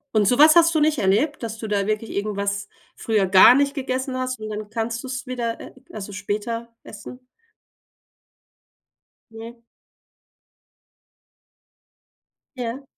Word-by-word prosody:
Und 210 -1 +3
so 245 - +2
was 310 +2 +7
hast 335 -1 +5
du 310 - +2
nicht 300 -1 +2
erlebt, 220 +11 +1
dass 225 -2 -5
du 220 - -6
da 200 -1 -1
wirklich 215 +1 -2
irgendwas 200 -1 -3 0.3
früher 215 -4 0
gar 190 +6 +8
nicht 280 0 +1
gegessen 260 -1 -3
hast 255 -2 -3
und 215 - -6
dann 210 0 -6
kannst 225 +1 -3
du's 255 -1 -6
wieder 240 -2 -4
e - - -11 0.2
also 205 -1 -7
später 210 +4 -4 0.2
essen? 250 0 -12 2.1
Mhm. 230 +1 -11 3.0
Ja. 245 +2 -5
230 Hz, 130 wpm, -22 LUFS, 210-255 Hz, 3.0 s, gar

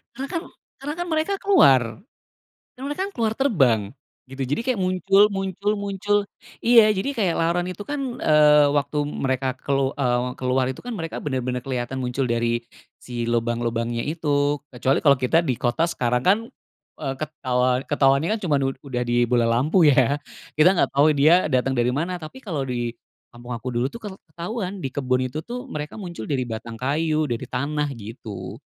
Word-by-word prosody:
Karena 270 +3 -4
kan 340 -2 -2 0.4
karena 290 +3 -5
kan 350 - -2
mereka 315 +5 0
keluar 350 - +6 1.0
karena 260 - -9
mereka 295 +6 -3
kan - - -19
keluar 220 -2 +1
terbang, 155 - +3 0.5
gitu 135 0 -7
jadi 145 - -1
kayak 255 - +1
muncul 195 +2 +4
muncul 195 +1 -1
muncul, 200 0 0 0.4
iya 230 -3 +6
jadi 195 +8 -2
kayak 185 -6 +1
laron 170 +2 +1
itu 185 +2 -6
kan, 290 -1 -2 0.2
eee, 150 -1 +6
waktu 145 +1 0
mereka 130 -2 -2
kelu 135 0 -1
eee, 125 -1 0
keluar 130 0 +1
itu 130 - -5
kan, 245 - -4
mereka 165 -5 -5
bener 130 -3 -1
bener 125 0 -2
keliatan 130 0 -3
muncul 125 0 -2
dari 120 0 0 0.4
si 120 -1 -4
lubang-lubangnya 115 0 -1
itu. 145 -2 0
Kecuali 130 +1 0
kalau 140 -4 +5
kita 130 +6 +2
di 130 -8 -1
kota, 160 +8 +1
sekarang 125 -4 0
kan, 190 +9 +4 0.6
eee, 135 -3 -2
ketau 130 -4 0
ketahuannya 140 +2 +3
kan - - -11
cuma 145 -5 +2
ud 135 0 -1
udah 125 -3 -3
di 120 0 +3
bola 120 -1 +2
lampu 145 +10 +3
ya, 140 +1 +3 0.3
kita 155 +3 +5
nggak - - +1
tahu, 140 +2 +4
dia 155 +3 +5
datang 130 0 +1
dari 120 -1 +1
mana. 170 +7 -2
Tapi 155 +11 -9
kalau 160 -8 -2
di 120 -3 -2 0.4
kampung 120 0 -6
aku 125 +2 -5
dulu 120 +3 0
tuh - - -7
kel 210 -3 -7 0.2
ketauan. 190 +3 -5
Di 135 - -4
kebun 130 -2 0
itu 155 +5 -5
tuh, 250 +5 -7
mereka 150 - -6
muncul 170 - -7
dari 130 -3 0
batang 115 0 -6
kayu, 155 +4 0
dari 120 -5 -3
tanah 145 +3 -1
gitu. 110 -2 -8
140 Hz, 180 wpm, -23 LUFS, 125-180 Hz, 1.0 s, keluar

